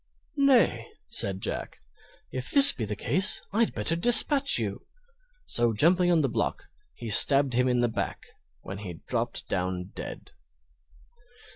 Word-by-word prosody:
"Nay," 240 - +1 0.2
said 95 -3 -4
Jack, - - -7 0.5
"if 130 0 -6
this 280 0 +8
be 115 - -7
the 105 0 -3
case 185 - -1
I'd 225 +2 -1
better 110 +9 -2
dispatch 265 - +6
you!" - - -6 0.6
So 120 -1 -1
jumping 175 - +1
upon 170 -2 +1
the - - 0
block, - - -4 0.3
he 120 - -10
stabbed 135 +5 +4
him 125 +2 0
in 125 -1 -1
the 120 - 0
back, 115 - -7 0.4
when 95 +1 -10
he 100 -4 -9
dropped - - -5
down 90 0 -5
dead. - - -10
125 Hz, 145 wpm, -25 LUFS, -, 0.6 s, this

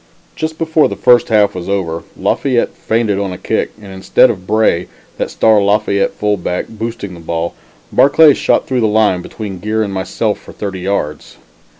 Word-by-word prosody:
Just 160 0 -4
before 160 -1 +2
the - - -4
first 120 -1 +4
half 105 -2 +3
was 90 0 -6
over, 85 -4 -2 0.2
Lafayette 125 -4 0
feinted 110 -3 -1
on 100 -2 -2
a 90 - -6
kick, 110 +4 -1
and 100 -2 -11
instead 95 +6 +3
of 95 -4 -9
Bray, 110 -5 +2 0.3
that - - -1
star 110 -2 +3
Lafayette 100 0 +1
fullback, 100 -4 -1
boosting 110 -3 -6
the 85 - -10
ball, 85 +1 -3 0.4
Barclay 145 +2 +6
shot - - +1
through 130 -2 -1
the 110 - +3
line 105 -4 +2
between 100 -1 -7
Geer 110 +3 -1
and 100 -2 -4
myself 100 +3 -2
for - - -14
thirty 100 -2 -5
yards. 90 -5 -3
105 Hz, 180 wpm, -15 LUFS, 95-110 Hz, 0.4 s, Barclay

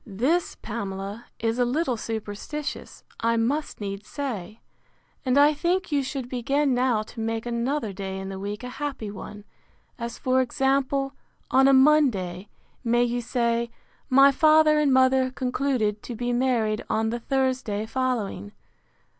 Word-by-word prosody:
This, 255 - 0
Pamela, 200 0 -5
is 225 +2 -1
a - - +5
little 255 +2 0
superstitious, 225 +6 -5 0.2
I 230 0 +1
must 280 +7 -1
needs 200 0 -5
say; 225 -7 -5 0.6
and 255 0 +2
I 290 +1 +6
think 350 +5 -1
you 285 -1 +2
should 265 -2 -4
begin 270 +3 0
now 245 -3 +2
to 225 +2 -12
make 225 0 -2
another 240 -1 -1
day 190 0 -5
in 190 0 -5
the 190 0 -6
week 205 +3 -5
a 250 - -5
happy 270 -8 -3
one; 205 0 -9 0.6
as 235 0 -5
for 260 0 +2
example; 270 +2 0 0.4
on 265 +1 +5
a - - +6
Monday, 240 -10 +3 0.3
may 240 0 +3
you 245 0 -1
say, 235 0 0 0.4
my 275 +2 +7
father 310 +1 +5
and 295 -2 +3
mother 260 0 +4
concluded 250 -5 -1
to 240 - -7
be 245 +2 -2
married 240 -4 +1
on 220 0 +1
the 240 - -2
Thursday 255 -5 -1
following. 230 -4 -2
245 Hz, 150 wpm, -25 LUFS, 220-270 Hz, 0.6 s, my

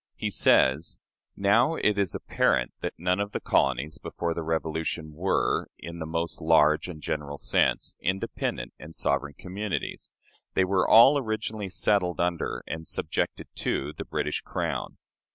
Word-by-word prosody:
He - - -3
says: 70 +5 +3 0.4
"Now, 115 +11 +4
it 105 - +2
is 100 -4 0
apparent - - +1
that - - -4
none 90 +2 +1
of 100 +1 -2
the - - -1
colonies 70 +3 +1
before 85 -1 -3
the 85 - -4
Revolution 80 0 -2
were, 90 +5 0
in 85 0 -8
the 80 - -4
most 85 +1 -3
large 80 -1 +4
and 80 -3 -7
general 70 -1 -3
sense, - - +1
independent 90 -9 -2
or 75 - -10
sovereign 70 -1 -1
communities. 100 +4 -4 0.5
They 95 - +4
were 95 0 +1
all 135 +6 +8
originally 110 -4 -3
settled 90 -2 +1
under 85 -1 -1
and 80 0 -5
subjected - - -2
to 75 +3 -1
the - - -6
British - - -2
Crown." - - -3
85 Hz, 150 wpm, -27 LUFS, 75-100 Hz, 0.5 s, all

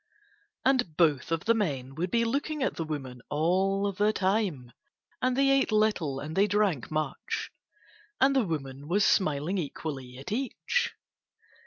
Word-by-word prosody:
And 250 - +2
both 155 -3 +2
of 165 0 -1
the 230 - +5
men 140 - -2
would 170 +5 -2
be 230 +4 +2
looking 285 +4 -1
at - - 0
the 165 - -2
woman 135 -5 -5
all 190 +6 +1
the 205 +2 +2
time, 190 - 0 0.5
and 255 0 +1
they 275 0 +4
ate 275 -3 +3
little 210 -10 +1
and 155 +3 -6
they 200 +2 +4
drank 200 - +1
much. 155 -3 -3 0.7
And 275 +1 +4
the 265 - +4
woman 140 -3 -4
was 195 +4 +3
smiling 155 +2 +2
equally 135 -5 -5
at 135 - -8
each. 270 - -1
180 Hz, 155 wpm, -28 LUFS, 145-215 Hz, 0.7 s, the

